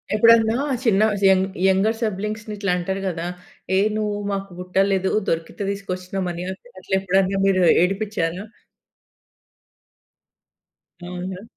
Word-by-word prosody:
ఎప్పుడన్నా 225 +1 +5 0.3
చిన్న‌స్ 210 -2 +2
young 190 0 +4 0.2
younger 200 +4 +2
సిబ్లింగ్స్‌ని 215 0 -3
ఇట్లా 200 -2 -1
అంటారు 190 +2 -3
కదా! 170 -2 -3 0.5
ఏ - - +4 0.2
నువ్వు 210 -1 -1
మాకు 195 0 -3
పుట్టలేదు, 190 +1 +1 0.2
దొరికితే 165 +5 -3
తీసుకొచ్చి‌నం 190 -1 -4
అని, 175 +1 -5 0.4
అట్లా 190 - -1
ఎప్పుడైనా 195 +1 +1
మీరు 190 -1 +3 0.2
ఏడిపించారా? 195 -2 -1 2.6
అవునా? 180 +2 -6
195 Hz, 105 wpm, -22 LUFS, 185-210 Hz, 2.6 s, ఎప్పుడన్నా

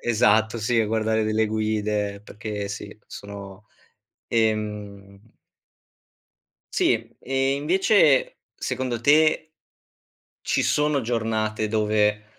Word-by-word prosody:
esatto 110 0 +2
sì, 115 +1 +1
a 110 - +1
guardare 110 0 0
delle 110 0 +1
guide 105 -2 -1
perché 105 -1 -6
sì 105 0 -7
sono, 100 0 -10 0.6
ehm 105 -2 -2 1.4
Sì! 360 -2 +1
E 135 +1 0
invece 160 -1 +3
secondo 125 -2 -3
te 155 +3 +3 0.9
ci - - 0
sono 150 -2 +1
giornate 110 -2 -1
dove 105 -1 +1
110 Hz, 90 wpm, -24 LUFS, 105-125 Hz, 1.4 s, invece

